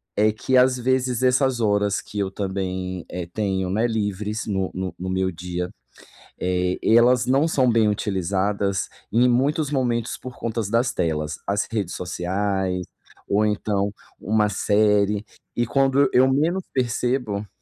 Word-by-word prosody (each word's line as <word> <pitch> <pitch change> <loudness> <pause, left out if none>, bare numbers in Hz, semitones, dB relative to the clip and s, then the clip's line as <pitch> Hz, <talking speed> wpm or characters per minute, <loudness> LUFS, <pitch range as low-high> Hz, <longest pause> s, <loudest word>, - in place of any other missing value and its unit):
é 105 +1 +3
que 130 +4 +1
às 125 0 +4
vezes 130 0 0
essas 130 -1 +2
horas 105 -1 +2
que 105 - -7
eu 95 -1 0
também, 95 -2 -4
eh, 90 -1 -4
tenho, 95 -3 -1
né, 110 +5 +1
livres 105 -1 -2
no 95 -3 -1
no 95 0 -4
no 95 +1 -4
meu 95 0 0
dia, 90 +1 -4 0.7
eh, 90 0 0
elas 120 +2 +5
não 135 +5 +3
são 130 -6 +2
bem 115 -2 +3
utilizadas 100 0 -1 0.2
em 120 +3 +4
muitos 140 +4 +1
momentos 120 -4 -1
por 125 -1 -9
conta 115 0 -2
das 120 +2 +2
telas, 75 -2 -1
as 100 +1 0
redes 105 -6 -2
sociais, 90 +1 -2 0.4
ou 105 +2 +2
então 105 -1 0 0.3
uma 105 0 +2
série, 105 0 +2 0.3
e 120 - +1
quando 135 0 +3
e - - +4
eu 130 +1 +6
menos 170 +7 +1
percebo 120 -4 -1
105 Hz, 150 wpm, -23 LUFS, 95-125 Hz, 0.7 s, eu